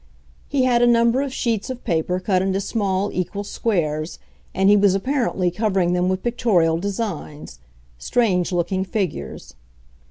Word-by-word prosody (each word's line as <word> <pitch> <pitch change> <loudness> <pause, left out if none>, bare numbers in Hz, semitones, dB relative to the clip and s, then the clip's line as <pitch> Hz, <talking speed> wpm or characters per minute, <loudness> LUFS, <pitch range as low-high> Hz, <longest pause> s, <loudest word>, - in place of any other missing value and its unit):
He 275 -2 +1
had 245 -2 +3
a 240 - +5
number 235 +2 +3
of 280 -1 -3
sheets 230 -5 -2
of 255 -1 -6
paper 180 -1 0
cut 185 0 +1
into 190 0 0
small 200 -1 -1
equal 190 +3 -3
squares, 165 -7 -2 0.3
and 190 +1 +1
he 205 - +7
was 200 -2 +4
apparently 230 -5 0
covering 190 -3 0
them 180 +1 +1
with 185 0 -2
pictorial 185 -9 +2
designs—strange 155 - -3
looking 180 +2 0
figures. 185 - -4
190 Hz, 145 wpm, -21 LUFS, 175-230 Hz, 0.3 s, he